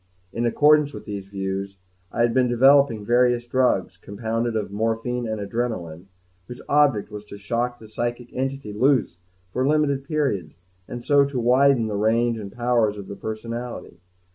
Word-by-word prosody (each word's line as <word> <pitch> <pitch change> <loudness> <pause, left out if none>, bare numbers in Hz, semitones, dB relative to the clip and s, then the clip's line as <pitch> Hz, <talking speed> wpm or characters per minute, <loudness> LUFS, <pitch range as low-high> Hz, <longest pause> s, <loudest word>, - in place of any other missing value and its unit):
In 120 +1 0
accordance 150 +1 +4
with 105 - -9
these 100 -2 -6
views, 95 0 -4 0.3
I - - -1
had 120 -1 +3
been 130 0 +3
developing 125 -2 +4
various 120 +1 +3
drugs, 120 -8 +1
compounded 115 +5 -3
of 105 -2 -2
morphine 115 +3 -2
and 110 -1 -3
adrenalin, 100 -6 -4 0.4
whose 125 - -9
object 140 -8 +2
was 105 0 -7
to 100 - -10
shock 120 +4 -2
the 110 - -13
psychic 120 +2 -4
entity 135 -4 -3
loose 125 -6 +1 0.3
for 130 +1 0
limited 145 -2 +1
periods 135 - -2 0.3
and 120 0 -7
so 145 +1 +4
to 140 -2 -3
widen 125 0 +4
the 110 - -3
range 115 +2 +1
and 100 -2 -7
powers 120 -2 +1
of 100 -1 -8
the 100 - -6
personality. 115 -3 -6
120 Hz, 165 wpm, -23 LUFS, 105-125 Hz, 0.4 s, accordance